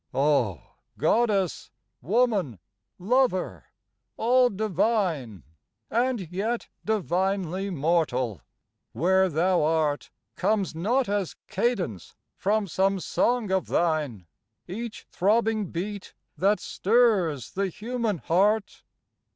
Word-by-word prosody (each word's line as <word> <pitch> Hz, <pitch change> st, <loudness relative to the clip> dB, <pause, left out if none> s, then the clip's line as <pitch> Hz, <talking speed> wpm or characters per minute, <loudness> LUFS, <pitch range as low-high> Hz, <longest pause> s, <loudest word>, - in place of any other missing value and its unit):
Oh! 130 Hz, -, +2 dB, 0.3 s
Goddess, 195 Hz, -, +1 dB, 0.3 s
woman, 195 Hz, -, +1 dB, 0.4 s
lover, 230 Hz, 0 st, 0 dB, 0.5 s
all 250 Hz, +2 st, +4 dB
divine 185 Hz, -, -1 dB, 0.5 s
And 235 Hz, -7 st, 0 dB
yet 220 Hz, +6 st, -2 dB
divinely 190 Hz, -2 st, -1 dB
mortal, 140 Hz, -, 0 dB, 0.5 s
where 190 Hz, +8 st, +3 dB
thou 175 Hz, +3 st, +2 dB
art 155 Hz, -1 st, 0 dB, 0.3 s
Comes 205 Hz, -5 st, 0 dB
not 235 Hz, +11 st, +1 dB
as 200 Hz, -3 st, -1 dB
cadence 190 Hz, -, -2 dB, 0.2 s
from 210 Hz, +1 st, 0 dB
some 195 Hz, +3 st, +1 dB
song 235 Hz, +2 st, 0 dB
of 190 Hz, -1 st, +1 dB
thine 150 Hz, -, 0 dB, 0.4 s
Each 225 Hz, +5 st, -6 dB
throbbing 215 Hz, +1 st, +1 dB
beat 200 Hz, +3 st, -5 dB, 0.2 s
that 200 Hz, +3 st, +2 dB
stirs 195 Hz, -, +1 dB
the 195 Hz, +1 st, -1 dB
human 225 Hz, +1 st, -2 dB
heart? 200 Hz, +7 st, +1 dB
190 Hz, 95 wpm, -26 LUFS, 165-220 Hz, 0.5 s, all